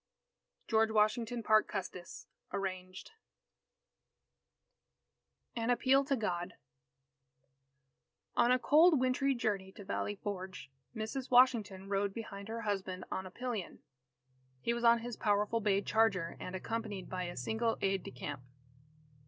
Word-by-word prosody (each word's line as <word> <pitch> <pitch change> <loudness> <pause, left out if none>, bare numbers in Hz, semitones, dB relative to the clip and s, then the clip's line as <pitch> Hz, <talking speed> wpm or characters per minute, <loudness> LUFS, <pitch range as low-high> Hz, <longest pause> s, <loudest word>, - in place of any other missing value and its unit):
George 220 -1 +3
Washington 225 +2 +1
Parke 215 0 +4
Custis 180 -3 -6 0.3
(Arranged) 185 - -5 2.4
AN 230 0 -1
APPEAL 260 +3 +4
TO 275 - +1
GOD 180 -6 -2 1.8
On 240 - +4
a 255 - +5
cold 305 +4 +5
wintry 260 +2 +2
journey 205 -5 -1
to 200 - -11
Valley 205 +1 -2
Forge, 185 -8 -6 0.2
Mrs. 220 +4 -4
Washington 230 -7 +4
rode 200 0 0
behind 200 -3 -7
her 230 +1 -4
husband 190 -4 -3
on 190 0 -3
a - - -8
pillion. 235 -2 -4 0.8
He 235 - 0
was 235 0 -3
on 235 0 +6
his 240 0 -5
powerful 210 +2 +1
bay 200 -1 +2
charger, 200 -7 +2
and 185 - -6
accompanied 210 0 -4
by 185 -1 -3
a 175 - -6
single 220 - 0
aide 195 -1 +1
de - - -8
camp. 135 +2 -6
215 Hz, 130 wpm, -33 LUFS, 190-235 Hz, 2.4 s, on